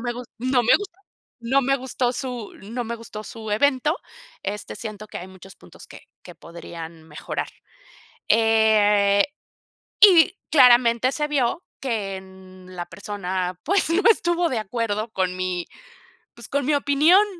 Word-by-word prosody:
me 240 0 -2
gus 245 0 -8
no 255 +1 +1
me 235 - +5
gustó, 390 -2 -9 0.4
no 265 +4 +2
me 275 +2 +2
gustó 255 -1 -2
su 250 -5 -5
no 235 +4 -5
me 235 +1 -4
gustó 215 -2 -9
su 220 -2 -8
evento, 285 - +2 0.5
este, 205 +1 -5
siento 215 -2 -7
que - - -8
hay 185 - -9
muchos 190 +1 -14
puntos - - -16
que - - -13 0.2
que 175 - -12
podrían 165 0 -10
mejorar." 155 -1 -5 0.8
Eh, 210 -3 +4 0.8
y 370 -1 +7
claramente 245 -2 +5
se 295 0 -2
vio 285 +3 0 0.2
que 215 -7 -3
en 185 -1 -14
la 175 -1 -4
persona, 185 -3 -4
pues, 385 0 +2
no 345 +4 +2
estuvo 345 -5 +2
de 235 - -1
acuerdo 215 0 -3
con 185 -2 -1
mi, 180 -1 -3 0.7
pues, - - -10
con 280 -2 -1
mi 300 - +2
opinión. 300 +8 +4
230 Hz, 150 wpm, -23 LUFS, 195-275 Hz, 0.8 s, y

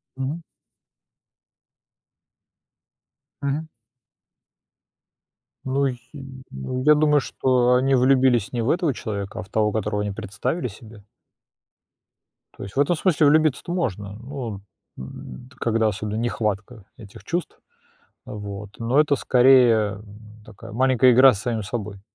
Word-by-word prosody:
Мгм. 135 +6 -4 3.0
Мгм. 145 +3 -2 2.0
Ну, 135 +1 +1
й 125 -2 -4 0.5
ну 125 - -5
я 150 0 +7
думаю, 150 -1 +3
что 125 -2 +1
они 135 +2 +2
влюбились 125 -4 +3
не 120 - -1
в 115 - -1
этого 170 -4 +1
человека, 100 -4 -5
а - - -4
в 95 - -18
того, 105 -1 +1
которого 105 -1 -2
они 105 -1 -2
представили 115 - -3
себе. 110 -1 -13 1.5
То - - -9
есть 95 - -9
в - - 0
этом 145 +5 +3
смысле 155 -3 +2
влюбиться-то 155 +2 +2
можно, 105 - -3
но, 115 -3 -7 0.4
э, - - -8 0.5
т 130 - -21
когда 115 -1 +1
особенно 105 +1 -3
нехватка 110 -2 -3
этих 105 -4 -13
чувств, 175 +1 -4 0.7
вот, 105 -1 -7
но 120 +5 +1
это 145 -2 +3
скорее, 120 -6 +4
м, 105 +1 -16
такая 105 -2 -12
маленькая 130 +1 +4
игра 130 +1 +7
с 100 - -6
самим 115 -2 -2
собой. 105 -2 -6
120 Hz, 125 wpm, -23 LUFS, 105-135 Hz, 3.0 s, я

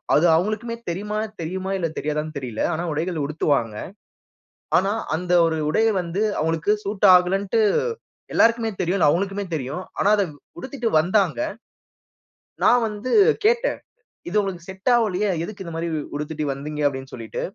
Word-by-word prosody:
அது 155 - +4
அவங்களுக்குமே 215 +6 -1
தெரியுமானு 210 +5 -2
தெரியுமா 185 +4 -3
இல்ல 170 -3 0
தெரியாதானு 150 +1 -3
தெரியல, 125 -5 -4
ஆனா 160 +2 -2
உடைகள் 160 0 -2
உடுத்துவாங்க. 140 -7 0 1.0
ஆனா 195 +3 +1 0.2
அந்த 180 +2 -3
ஒரு 160 -1 -1
உடைய 225 +8 +3
வந்து 175 +3 -2 0.2
அவங்களுக்கு 160 +4 +1
சூட் 205 0 +1
ஆகலன்ட்டு 195 +4 +1 0.7
எல்லோருக்குமே 230 0 +3
தெரியும், 185 +2 +1
அது 150 - +6
அவங்களுக்குமே 195 +4 -1
தெரியும், 140 +4 -3 0.2
ஆனா 205 - +3
அத 200 - +3 0.3
உடுத்திட்டு 245 +4 -3
வந்தாங்க. 175 - +1 1.3
நான் 245 -1 +5
வந்து 215 +4 -5 0.3
கேட்டேன், 480 +3 +2 0.5
இது 185 - -3
உங்களுக்கு 185 -4 -4
செட் 190 +6 -2
ஆவலியே, 210 -4 +1 0.2
எதுக்கு 200 +1 -7
இந்த 170 - -7
மாதிரி 165 +1 -2
உ - - -1 0.2
உடுத்திட்டு 150 +1 -3
வந்தீங்க, 150 +2 -5
அப்படினு 135 -1 -3
சொல்லிட்டு. 115 -2 -6
180 Hz, 145 wpm, -23 LUFS, 155-205 Hz, 1.3 s, அது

